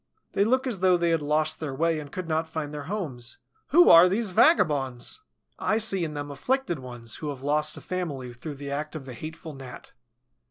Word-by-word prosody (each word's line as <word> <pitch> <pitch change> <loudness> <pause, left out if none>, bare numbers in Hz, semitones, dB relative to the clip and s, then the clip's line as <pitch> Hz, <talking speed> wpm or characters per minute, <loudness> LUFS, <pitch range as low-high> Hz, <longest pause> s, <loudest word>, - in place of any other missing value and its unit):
They 200 - +3
look 255 +5 +2
as 235 -7 -2
though 185 -1 +4
they 170 -1 +1
had 165 -2 +2
lost 155 +1 0
their 145 -4 -4
way 165 +2 +1
and 145 -2 -9
could 185 -2 -5
not 160 0 0
find 155 -2 -5
their 145 -1 -6
homes. 145 - -5 0.3
Who 350 +6 +6
are 170 +2 +9
these 205 +1 0
vagabonds? 155 - +2 0.4
I 215 - +1
see 200 -5 +1
in 155 -2 -4
them 145 0 -5
afflicted 175 - -1
ones 120 -3 -6
who 150 - -4
have 135 -2 -7
lost 150 +2 +1
a - - -9
family 145 -9 -4
through 145 +5 -7
the 140 0 -7
act 150 +3 -4
of 145 -4 -6
the 130 - -8
hateful 160 +5 -8
Gnat. 135 -2 -11
155 Hz, 210 wpm, -26 LUFS, 140-185 Hz, 0.4 s, are